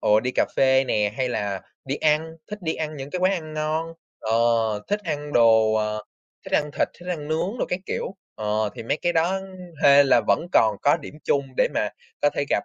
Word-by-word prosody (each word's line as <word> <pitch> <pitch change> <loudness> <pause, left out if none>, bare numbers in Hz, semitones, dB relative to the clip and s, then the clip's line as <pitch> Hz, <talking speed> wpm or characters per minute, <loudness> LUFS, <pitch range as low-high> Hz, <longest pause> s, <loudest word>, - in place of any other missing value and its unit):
ồ, 105 +1 +4
đi 125 +1 -2
cà - - +3
phê 130 0 +4
nè, 105 -4 0
hay 130 -1 0
là 100 -5 -2 0.2
đi 135 +2 -2
ăn, 160 +1 +1
thích 210 - -5
đi 160 - -1
ăn 155 -1 -4
những 135 +1 -7
cái 180 - -3
quán 185 +1 +3
ăn 155 -4 -4
ngon, 155 +1 -1 0.3
ờ, 110 0 -2 0.6
thích 205 +1 0
ăn 150 -2 -4
đồ, 110 -3 +5
ờ, 105 0 -1 0.4
thích - - -10
ăn 150 0 +2
thịt, - - 0
thích 180 - -9
ăn 155 -4 -4
nướng 185 +9 -1
đồ - - +1
các 180 +1 -2
kiểu. 195 - -4 0.2
Ờ, 105 0 -1
thì - - -7
mấy 115 - -1
cái 175 - +2
đó 175 +4 +1 0.4
hên 140 0 +7
là - - +5
vẫn - - +2
còn 110 -2 +4
có 145 - +4
điểm 150 -2 -10
chung 140 -1 +1
để - - +3
mà - - +1 0.3
có - - +4
thể - - 0
gặp. - - +1
145 Hz, 230 wpm, -24 LUFS, 110-160 Hz, 0.6 s, hên